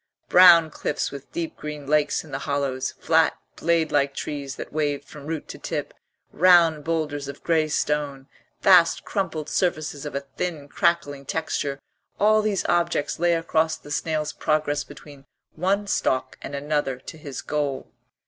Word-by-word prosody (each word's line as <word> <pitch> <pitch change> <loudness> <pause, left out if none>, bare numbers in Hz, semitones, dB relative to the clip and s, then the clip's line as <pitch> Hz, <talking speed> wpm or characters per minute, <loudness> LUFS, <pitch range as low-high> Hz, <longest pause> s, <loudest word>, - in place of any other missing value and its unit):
Brown 170 -3 +8
cliffs 150 - -2
with 140 -1 -10
deep 170 -1 -4
green 150 -1 -7
lakes 150 +1 +1
in 155 - -14
the 135 - -3
hollows, 140 -2 -2
flat, 160 0 +3 0.2
blade 165 -2 +1
like 140 -1 +1
trees 140 -2 -5
that - - -8
waved 145 -2 -1
from 150 -1 -11
root 160 -2 -4
to - - -8
tip, - - -4 0.4
round 170 -4 +5
boulders 150 -3 -2
of 140 0 -9
grey 160 -2 +2
stone, 145 -3 -1 0.3
vast 180 -4 +5
crumpled 165 -7 -2
surfaces 155 -4 -1
of 150 - -6
a 140 - -1 0.2
thin 160 -5 -3
crackling 145 -3 0
texture 145 -3 -2 0.4
all 215 +1 +5
these 210 -3 -1
objects 170 -4 0
lay 170 0 +3
across 160 -1 +1
the 145 - -13
snail's 155 0 -1
progress 155 -2 0
between 145 -1 -14 0.3
one 195 +5 0
stalk 130 -9 0
and 140 - -6
another 145 -2 -1
to 155 +4 -11
his 140 -4 -7
goal. 145 -3 -2
150 Hz, 160 wpm, -24 LUFS, 145-165 Hz, 0.4 s, Brown